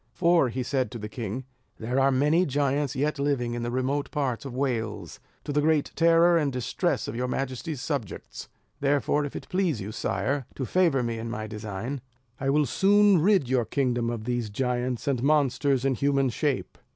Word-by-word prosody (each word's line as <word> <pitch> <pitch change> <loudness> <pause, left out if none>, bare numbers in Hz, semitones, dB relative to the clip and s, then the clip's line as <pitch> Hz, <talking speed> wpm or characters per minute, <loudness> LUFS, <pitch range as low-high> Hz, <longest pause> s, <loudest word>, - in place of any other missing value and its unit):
"For," 170 -7 +3
said 130 0 0
he - - -16
to 120 - -7
the 105 -1 -6
king, 115 +2 -5 0.3
"there 125 +4 -1
are 135 0 +4
many 150 +7 +3
giants 140 0 0
yet 150 +2 -1
living 135 -4 0
in 120 - -3
the 120 - -2
remote 130 +3 -1
parts 140 -5 -2
of 130 -3 -6
Wales, 110 - -2 0.2
to 145 - -4
the 150 - +2
great 155 -1 +2
terror 170 +1 +5
and 145 -3 0
distress 125 -2 -1
of 110 - -5
your 125 +2 -1
majesty's 135 +2 -3
subjects; 135 - -5 0.3
therefore 145 +1 +1
if 145 - -7
it - - -7
please 180 - 0
you, 100 +1 -5
sire, 115 +7 -2
to 130 - -3
favour 165 -5 +2
me 115 -1 -2
in 115 +1 -5
my 110 -1 -4
design, 110 +5 -5 0.4
I 135 - -1
will 150 +1 +3
soon 200 - +4
rid 190 -6 +3
your 125 -1 +2
kingdom 120 -2 0
of 115 -2 -4
these 120 -2 -2
giants 125 +2 -2
and 130 -4 +1
monsters 140 -2 +2
in 135 - +3
human 135 0 +1
shape." 140 +1 -2
135 Hz, 190 wpm, -26 LUFS, 120-145 Hz, 0.4 s, terror